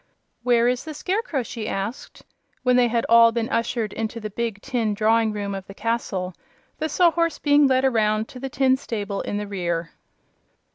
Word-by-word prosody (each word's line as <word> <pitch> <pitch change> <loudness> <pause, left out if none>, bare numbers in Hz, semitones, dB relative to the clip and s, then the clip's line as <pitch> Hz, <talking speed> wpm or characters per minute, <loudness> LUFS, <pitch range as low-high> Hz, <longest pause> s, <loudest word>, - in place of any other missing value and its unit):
"Where 240 -1 +3
is 250 0 0
the 310 -1 -7
Scarecrow?" 360 - -1
she 225 -2 -5
asked, 200 +6 -5 0.4
when 250 -1 +3
they 245 -1 +5
had 235 0 0
all 230 0 +7
been 230 -1 -1
ushered 230 -2 -1
into 225 +1 -4
the 215 -1 -6
big 230 -1 -3
tin 230 -6 -1
drawing 220 +1 +3
room 205 -1 -4
of 195 -1 -6
the 195 - -11
castle, 200 -6 -2 0.5
the 315 0 -1
Sawhorse 335 -1 +2
being 290 -1 +4
led 260 0 +2
around 220 -3 +2
to 250 - -10
the 270 +1 -4
tin 260 0 +2
stable 205 -6 -4
in 205 - -3
the 210 - -3
rear. 175 -4 -3
230 Hz, 185 wpm, -23 LUFS, 210-260 Hz, 0.5 s, all